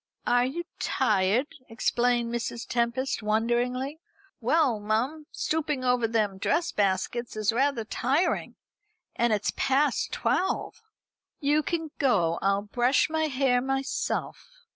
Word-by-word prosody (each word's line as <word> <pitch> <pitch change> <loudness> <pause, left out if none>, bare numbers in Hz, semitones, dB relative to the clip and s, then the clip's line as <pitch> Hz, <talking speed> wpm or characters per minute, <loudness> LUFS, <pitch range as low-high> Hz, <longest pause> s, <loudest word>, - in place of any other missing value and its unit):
"Are 245 0 +3
you 335 +6 -4 0.2
tired?" 205 +5 +2 0.2
exclaimed 240 +1 +1
Mrs. 235 0 -3
Tempest, 240 +2 -1
wonderingly. 240 +6 0 0.4
"Well, 255 -2 +2
mum, 245 +9 -1
stooping 300 -4 -1
over 250 -2 +2
them 210 -4 0
dress 335 - +1
baskets 205 +5 -1
is 215 +1 +1
rather 265 -1 +1
tiring, 275 +10 0 0.6
and 235 0 +2
it's 210 -1 0
past 275 0 +1
twelve." 380 - -1 0.6
"You 295 +1 +2
can 320 0 -3
go. 175 -11 +2
I'll 195 +1 +1
brush 245 +8 +2
my 315 0 +1
hair 260 -3 +2
myself." 270 +1 -2
245 Hz, 120 wpm, -27 LUFS, 225-280 Hz, 0.6 s, Are